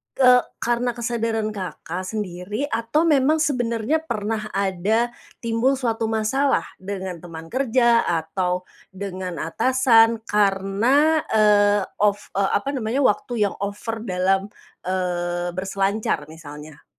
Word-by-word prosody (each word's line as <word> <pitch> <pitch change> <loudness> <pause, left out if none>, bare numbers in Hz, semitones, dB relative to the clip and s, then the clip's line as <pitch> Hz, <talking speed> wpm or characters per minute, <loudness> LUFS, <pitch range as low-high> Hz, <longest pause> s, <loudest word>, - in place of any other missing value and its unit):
ke 250 -1 +6 0.2
karena 240 0 0
kesadaran 230 -2 -1
Kakak 185 -2 -6
sendiri 205 +2 -4
atau 230 +8 +1
memang 300 -2 +3
sebenarnya 250 -3 0
pernah 220 -7 -3
ada 200 +5 +1 0.3
timbul 230 +4 +2
suatu 230 -4 -1
masalah 225 +6 +1 0.2
dengan 190 -2 -5
teman 165 -1 -10
kerja 240 -2 +3
atau, 180 +2 -1 0.3
dengan 185 -2 -5
atasan 230 - +3
karena, 210 +10 +2
eee, 205 -1 +4 0.2
ov 205 -1 +3 0.2
eee, 195 0 +2
apa 270 +7 0
namanya 240 +1 -1
waktu 230 0 +1
yang - - -7
over 205 +3 -4
dalam, 190 0 +1 0.4
eee, 175 -1 -1
berselancar 195 -3 -1
misalnya. 150 -2 -11
215 Hz, 115 wpm, -22 LUFS, 185-240 Hz, 0.4 s, ke